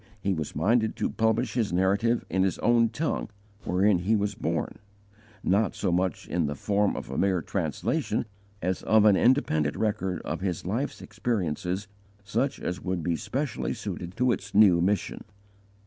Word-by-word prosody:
He 100 Hz, 0 st, 0 dB
was 80 Hz, -4 st, -4 dB
minded 110 Hz, +8 st, +2 dB
to -, -, -1 dB
publish 110 Hz, 0 st, +1 dB
his 115 Hz, -6 st, 0 dB
Narrative 100 Hz, +6 st, +2 dB
in 95 Hz, -, 0 dB
his 95 Hz, -2 st, +1 dB
own 120 Hz, -1 st, +3 dB
tongue 145 Hz, +8 st, -2 dB, 0.4 s
wherein 95 Hz, +1 st, +3 dB
he 100 Hz, +6 st, +1 dB
was 105 Hz, -1 st, 0 dB
born, -, -, -3 dB, 0.6 s
not 100 Hz, +3 st, +2 dB
so 95 Hz, -, -1 dB
much 90 Hz, -1 st, -1 dB
in 85 Hz, -4 st, 0 dB
the 75 Hz, -, -3 dB
form 100 Hz, +6 st, +1 dB
of -, -, -6 dB
a 65 Hz, -, -2 dB
mere 95 Hz, -3 st, +1 dB
translation, -, -, -1 dB, 0.4 s
as 90 Hz, +1 st, -1 dB
of 110 Hz, -1 st, +4 dB
an 105 Hz, -2 st, +7 dB
independent 85 Hz, -, +2 dB
record 95 Hz, -4 st, -1 dB
of -, -, -4 dB
his 90 Hz, -4 st, -2 dB
life's 115 Hz, +10 st, -2 dB
experiences 100 Hz, -4 st, -2 dB, 0.4 s
such 120 Hz, +7 st, -1 dB
as 90 Hz, +3 st, -4 dB
would 90 Hz, -2 st, -2 dB
be 85 Hz, -1 st, 0 dB
specially 135 Hz, -, -3 dB
suited 90 Hz, +4 st, -6 dB
to 125 Hz, 0 st, +3 dB
its -, -, -4 dB
new 95 Hz, -5 st, +6 dB
mission. 100 Hz, +3 st, -1 dB
100 Hz, 165 wpm, -27 LUFS, 90-110 Hz, 0.6 s, an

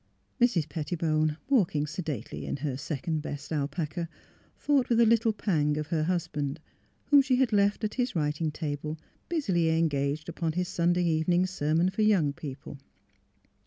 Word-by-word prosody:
Mrs. 195 Hz, -11 st, +3 dB
Pettibone, 155 Hz, -1 st, -1 dB
walking 180 Hz, -, +2 dB
sedately 150 Hz, -, -5 dB
in -, -, -2 dB
her 135 Hz, -3 st, -1 dB
second 155 Hz, +3 st, -3 dB
best 145 Hz, 0 st, -7 dB
alpaca, 155 Hz, +3 st, -2 dB, 0.5 s
thought 280 Hz, -4 st, +1 dB
with 235 Hz, -1 st, +3 dB
a 235 Hz, -, +7 dB
little 225 Hz, 0 st, +4 dB
pang 150 Hz, -8 st, 0 dB
of 150 Hz, -1 st, -4 dB
her 155 Hz, -2 st, 0 dB
husband 155 Hz, -4 st, -2 dB, 0.5 s
whom 285 Hz, -1 st, +8 dB
she 265 Hz, -1 st, +2 dB
had 250 Hz, -3 st, +2 dB
left 205 Hz, +1 st, +2 dB
at 215 Hz, -, -1 dB
his 250 Hz, -4 st, -1 dB
writing 150 Hz, 0 st, 0 dB
table, 150 Hz, 0 st, -4 dB, 0.3 s
busily 190 Hz, -, +1 dB
engaged 155 Hz, -2 st, 0 dB
upon 165 Hz, -1 st, -2 dB
his 180 Hz, +1 st, -1 dB
Sunday 175 Hz, 0 st, +1 dB
evening 170 Hz, +2 st, +2 dB
sermon 170 Hz, 0 st, +1 dB
for 195 Hz, -, -2 dB
young 190 Hz, -10 st, +3 dB
people. 145 Hz, -3 st, -8 dB
165 Hz, 155 wpm, -28 LUFS, 150-190 Hz, 0.5 s, whom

